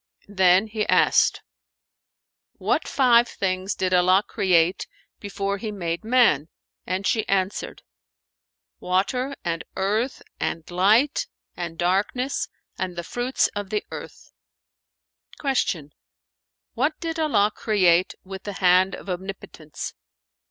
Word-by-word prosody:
Then 185 +1 +5
he 215 -1 -3
asked, - - +3 1.1
"What - - -1
five 240 -3 +4
things 185 0 -2
did 185 0 -1
Allah 185 +2 +4
create 180 -3 +2 0.3
before 200 0 -3
he 215 +1 -4
made 170 -2 -3
man?"; 220 - +3 0.4
and 185 +2 -2
she 220 +2 +1
answered, 195 0 -1 1.0
"Water 250 +9 0
and 165 -1 -2
earth 215 +7 -1 0.2
and 165 - -2
light 220 - +3 0.3
and 170 -2 -5
darkness 200 +10 0 0.3
and 185 -1 -3
the 175 - -4
fruits 245 +8 0
of 205 -1 -4
the 210 0 -1
earth." - - -10 1.1
Q 180 - -1 0.8
"What 310 +1 0
did 330 -1 -4
Allah 215 -10 +2
create 185 -5 +2
with 190 0 -8
the 205 - -6
hand 185 0 +3
of - - -12
omnipotence?" 180 -4 -6
195 Hz, 115 wpm, -24 LUFS, 180-220 Hz, 1.1 s, Then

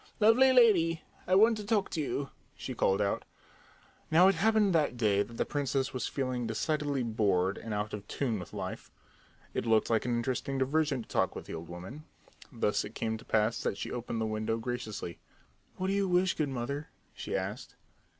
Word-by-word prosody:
"Lovely 230 +5 +6
lady, 180 -10 +4 0.2
I 185 - +4
want 220 +3 +6
to 210 - -5
talk 205 -1 0
to 160 - -1
you!" 140 -1 -3 0.2
she 130 - -6
called 100 -4 +2
out. 100 - -1 0.9
Now 170 +4 +6
it 195 - +5
happened 210 +2 +3
that 150 -6 +2
day 105 -4 +3
that 115 +3 -5
the - - +1
princess 135 -2 -1
was 130 - -2
feeling 130 -3 -2
decidedly 145 +3 -1
bored 100 -4 +1
and 115 - -7
out 105 +1 -2
of 105 0 -6
tune 120 -7 -1
with 90 - -9
life. - - -6 0.6
It 115 - -2
looked 110 0 +3
like 110 0 +2
an 120 -1 +1
interesting 130 +3 -2
diversion 140 -1 +1
to - - -20
talk - - 0
with - - -7
the - - -8
old 80 0 -7
woman. 95 - -8 0.5
Thus 105 -5 0
it 105 - -9
came 110 -1 -2
to - - -14
pass 110 +1 +1
that 100 - -1
she - - -5
opened 120 -1 -3
the 110 - 0
window 110 +1 -1
graciously. 110 -6 -5 0.6
"What 185 - -3
do 190 - +1
you 200 -1 +1
wish, 180 +1 +3
good 150 -2 -1
mother?" 135 +4 -4 0.2
she - - -5
asked. - - -4
130 Hz, 200 wpm, -31 LUFS, 110-165 Hz, 0.9 s, Lovely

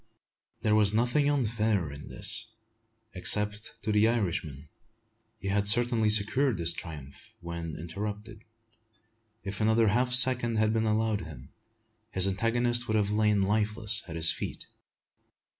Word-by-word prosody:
There 105 - +1
was 105 -1 +4
nothing 125 +6 +2
unfair 110 - 0
in 70 +1 -10
this, 115 0 -3 0.6
except 105 +3 0
to 110 - -1
the 105 +1 +4
Irish 110 -7 0
man. 75 -1 -11 0.7
He 100 -2 -5
had 100 +1 0
certainly 115 0 +2
secured 110 +4 +3
his 85 -1 0
triumph, 75 -5 -10
when 85 -2 -6
interrupted. 105 +5 -7 1.0
If 100 +1 -6
another 110 0 +3
half 125 +4 +1
second 125 -2 +4
had 110 0 +2
been 110 0 0
allowed 110 -1 0
him, 70 -5 -11 0.6
his 95 -3 +2
antagonist 120 +4 0
would 110 - +1
have 105 -1 0
lain 105 -2 +2
lifeless 105 +1 -1
at 80 - -7
his 80 0 +2
feet. - - -5
105 Hz, 140 wpm, -28 LUFS, 95-115 Hz, 1.0 s, was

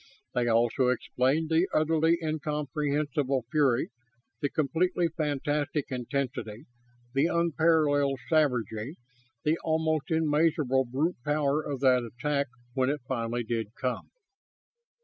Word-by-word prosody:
They 120 -1 +1
also 120 +2 +2
explain 130 +4 +1
the 165 +3 +2
utterly 160 +2 +3
incomprehensible 150 -3 -1
fury, 135 -5 +2 0.5
the 145 - 0
completely 170 +5 +1
fantastic 145 -1 -1
intensity, 125 -2 -3 0.5
the 140 +4 +3
unparalleled 155 -4 +2
savagery, 125 - 0 0.5
the 155 +2 +1
almost 160 0 0
immeasurable 150 -4 +2
brute 140 +8 -1
power 150 0 +1
of 140 -4 -5
that 130 -2 +5
attack 140 +5 -2 0.3
when 130 -1 +1
it 145 0 -2
finally 120 -1 -2
did 115 -1 -3
come. 125 -2 -3
145 Hz, 110 wpm, -28 LUFS, 130-155 Hz, 0.5 s, that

